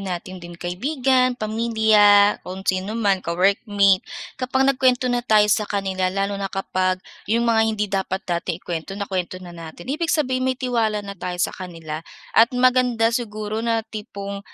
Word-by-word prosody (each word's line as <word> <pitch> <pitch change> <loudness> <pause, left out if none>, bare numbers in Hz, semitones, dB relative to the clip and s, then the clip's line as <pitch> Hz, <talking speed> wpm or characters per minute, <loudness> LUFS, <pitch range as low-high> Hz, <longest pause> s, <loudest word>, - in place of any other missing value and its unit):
natin 185 -1 -6
din 175 0 -10
kaibigan, 255 - +1
pamilya, 215 -2 +4
kung 190 +1 -8
sino 190 +3 -1
man, 200 -4 +1
ka-workmate. 195 +2 +2 0.4
Kapag 260 +1 +1
nagkuwento 255 -1 +2
na 245 - +1
tayo 215 -3 +4
sa 210 -1 0
kanila 190 -2 -1
lalo 195 +2 -1
na 195 - -2
kapag 185 -1 -1 0.3
'yong 235 +2 +2
mga 230 -1 +3
hindi 210 -1 0
dapat 190 0 -2
nating 170 -3 -2
ikuwento 175 +2 -6
nakuwento 185 -3 -3
na 180 -1 -10
natin. 165 0 -10
Ibig 310 +5 -2
sabihin 260 -4 +1
may 255 - 0
tiwala 225 -5 -1
na 200 - -6
tayo 180 -1 -5
sa 175 - 0
kanila. 165 -4 -7 0.3
At 230 +2 +6
maganda 250 -2 +3
siguro 215 -2 -3
na 230 -1 0
tipong, 200 -2 -7
205 Hz, 160 wpm, -22 LUFS, 185-235 Hz, 0.4 s, At